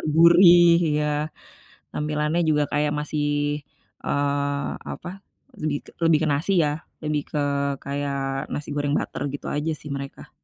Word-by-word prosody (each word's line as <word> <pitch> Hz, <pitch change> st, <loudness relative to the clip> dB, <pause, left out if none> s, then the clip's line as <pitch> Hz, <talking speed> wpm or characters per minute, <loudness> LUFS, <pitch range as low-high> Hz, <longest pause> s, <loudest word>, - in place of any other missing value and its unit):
gurih 175 Hz, +1 st, +8 dB, 0.2 s
iya, 150 Hz, 0 st, +1 dB, 0.9 s
tampilannya 150 Hz, +2 st, -1 dB
juga 150 Hz, -1 st, +3 dB
kayak 150 Hz, 0 st, +1 dB
masih, 150 Hz, 0 st, -2 dB, 0.8 s
eee, 140 Hz, 0 st, -1 dB
apa, -, -, -7 dB, 0.5 s
lebih 150 Hz, -1 st, 0 dB
ke -, -, -13 dB
lebih 165 Hz, -2 st, +5 dB
ke 155 Hz, -, +1 dB
nasi, 145 Hz, +7 st, -1 dB
ya, -, -, +2 dB, 0.3 s
lebih 150 Hz, -1 st, -1 dB
ke 150 Hz, -, -2 dB, 0.5 s
kayak 140 Hz, 0 st, -2 dB, 0.4 s
nasi 145 Hz, -, -5 dB
goreng 145 Hz, 0 st, 0 dB
butter, -, -, -4 dB
gitu, -, -, -6 dB
aja, 155 Hz, +2 st, -1 dB
sih, 150 Hz, -, -9 dB
mereka. 140 Hz, 0 st, -8 dB
150 Hz, 140 wpm, -24 LUFS, 145-155 Hz, 0.9 s, gurih